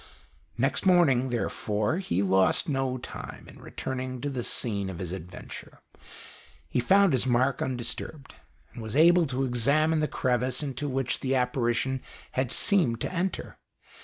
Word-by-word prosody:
Next 135 Hz, +4 st, +1 dB
morning, 155 Hz, -9 st, +4 dB
therefore, 110 Hz, +1 st, -1 dB
he 100 Hz, -, -1 dB
lost 95 Hz, -, +3 dB
no 135 Hz, -3 st, -1 dB
time 125 Hz, -, -9 dB
in -, -, -14 dB
returning 130 Hz, -1 st, -5 dB
to 145 Hz, -, -2 dB
the 130 Hz, -2 st, -3 dB
scene 100 Hz, -5 st, -1 dB
of 95 Hz, -, -6 dB
his 90 Hz, -2 st, -5 dB
adventure. 90 Hz, -1 st, -9 dB, 0.9 s
He -, -, -1 dB
found 195 Hz, +8 st, +4 dB
his 130 Hz, 0 st, +1 dB
mark 130 Hz, +2 st, +2 dB
undisturbed, 130 Hz, +3 st, -4 dB, 0.4 s
and -, -, -8 dB
was 110 Hz, +2 st, -5 dB
able 170 Hz, +2 st, +6 dB
to 135 Hz, 0 st, -1 dB
examine 140 Hz, +6 st, +2 dB
the 150 Hz, -, +1 dB
crevice 125 Hz, +1 st, 0 dB
into 145 Hz, +1 st, -3 dB
which 130 Hz, -1 st, -1 dB
the 135 Hz, 0 st, 0 dB
apparition 125 Hz, +1 st, 0 dB, 0.3 s
had 130 Hz, -1 st, -1 dB
seemed 150 Hz, -, +3 dB
to -, -, -3 dB
enter. 185 Hz, +2 st, -3 dB
130 Hz, 150 wpm, -27 LUFS, 120-145 Hz, 0.9 s, able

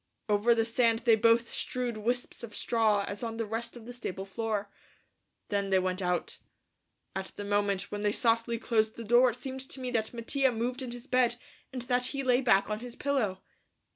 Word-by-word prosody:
Over 215 Hz, +3 st, +4 dB
the 225 Hz, -1 st, +2 dB
sand 230 Hz, 0 st, +2 dB
they 230 Hz, -, +6 dB
both 230 Hz, +2 st, +4 dB
strewed 250 Hz, -4 st, -2 dB
wisps 240 Hz, +4 st, -2 dB
of 235 Hz, -3 st, -8 dB
straw 215 Hz, -4 st, +2 dB
as 200 Hz, -, -5 dB
on 225 Hz, -1 st, -3 dB
the 230 Hz, -, -1 dB
rest 225 Hz, +3 st, -4 dB
of 225 Hz, -, -12 dB
the 245 Hz, -, -8 dB
stable 195 Hz, -5 st, -5 dB
floor. 210 Hz, 0 st, -2 dB, 0.8 s
Then 200 Hz, -1 st, 0 dB
they 190 Hz, -, +4 dB
went 185 Hz, 0 st, 0 dB
out. 180 Hz, -1 st, -1 dB, 0.8 s
At 190 Hz, 0 st, -3 dB
the 205 Hz, -, -5 dB
moment 205 Hz, -1 st, 0 dB
when 205 Hz, -, -3 dB
they 205 Hz, 0 st, +2 dB
softly 230 Hz, +1 st, +1 dB
closed 220 Hz, -1 st, +1 dB
the 230 Hz, -, -7 dB
door 240 Hz, +3 st, +5 dB
it 235 Hz, -, -4 dB
seemed 265 Hz, +1 st, -6 dB
to 265 Hz, -, -8 dB
me 255 Hz, -1 st, -3 dB
that 220 Hz, -2 st, 0 dB
Mattia 260 Hz, +3 st, +1 dB
moved 245 Hz, +3 st, -2 dB
in 255 Hz, -, -4 dB
his 240 Hz, +1 st, -8 dB
bed 250 Hz, -3 st, +2 dB, 0.4 s
and 255 Hz, -2 st, -3 dB
that 250 Hz, 0 st, +1 dB
he 275 Hz, 0 st, -3 dB
lay 250 Hz, 0 st, +3 dB
back 200 Hz, -6 st, +4 dB
on 210 Hz, 0 st, -2 dB
his 245 Hz, 0 st, -8 dB
pillow. 240 Hz, -10 st, -1 dB
230 Hz, 205 wpm, -30 LUFS, 205-245 Hz, 0.8 s, they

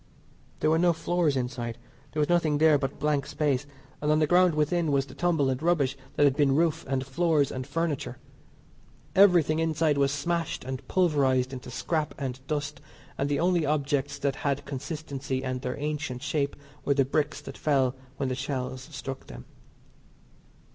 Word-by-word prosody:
There 155 Hz, -, +3 dB
were 160 Hz, -, +3 dB
no 175 Hz, 0 st, +4 dB
floors 165 Hz, -3 st, +1 dB
inside, 120 Hz, -2 st, -3 dB, 0.3 s
there 155 Hz, -, -3 dB
was 150 Hz, -, +3 dB
nothing 165 Hz, -4 st, +2 dB
there 155 Hz, -1 st, +5 dB
but 135 Hz, -1 st, -3 dB
blank 150 Hz, -2 st, 0 dB
space; 145 Hz, -2 st, 0 dB, 0.3 s
and 150 Hz, 0 st, +1 dB
on 155 Hz, -, +4 dB
the 155 Hz, -, +4 dB
ground 175 Hz, 0 st, +4 dB
within 155 Hz, +1 st, +1 dB
was 135 Hz, -1 st, +2 dB
the 130 Hz, -, -13 dB
tumble 160 Hz, -2 st, +1 dB
and 130 Hz, +1 st, -1 dB
rubbish 155 Hz, -6 st, +2 dB, 0.2 s
that -, -, +3 dB
had 140 Hz, -2 st, +4 dB
been 140 Hz, -2 st, +3 dB
roof 165 Hz, 0 st, +2 dB
and 135 Hz, -1 st, 0 dB
floors 145 Hz, +1 st, +2 dB
and 130 Hz, 0 st, -5 dB
furniture. 160 Hz, -1 st, -2 dB, 1.0 s
Everything 175 Hz, -5 st, +5 dB
inside 160 Hz, -2 st, +1 dB
was 140 Hz, -1 st, +3 dB
smashed 165 Hz, +3 st, -2 dB
and 130 Hz, +1 st, -5 dB
pulverised 135 Hz, -7 st, +2 dB
into 125 Hz, -2 st, -7 dB
scrap 155 Hz, +5 st, -2 dB
and 130 Hz, -2 st, -4 dB
dust, 145 Hz, -1 st, -3 dB, 0.3 s
and 140 Hz, -, -1 dB
the 145 Hz, -1 st, +1 dB
only 175 Hz, 0 st, +2 dB
objects 145 Hz, -1 st, 0 dB
that 140 Hz, -1 st, -1 dB
had 140 Hz, -1 st, -1 dB
consistency 140 Hz, -2 st, -4 dB
and 130 Hz, -1 st, -3 dB
their 125 Hz, 0 st, -3 dB
ancient 145 Hz, -4 st, -3 dB
shape 145 Hz, -2 st, -1 dB, 0.3 s
were 140 Hz, -, +2 dB
the 135 Hz, -1 st, +3 dB
bricks 145 Hz, +1 st, 0 dB
that -, -, -9 dB
fell 135 Hz, -4 st, +2 dB, 0.2 s
when 135 Hz, -, -1 dB
the 130 Hz, -, -1 dB
shells 130 Hz, -1 st, -3 dB
struck 135 Hz, -2 st, -6 dB
them. -, -, -10 dB
145 Hz, 175 wpm, -27 LUFS, 135-155 Hz, 1.0 s, there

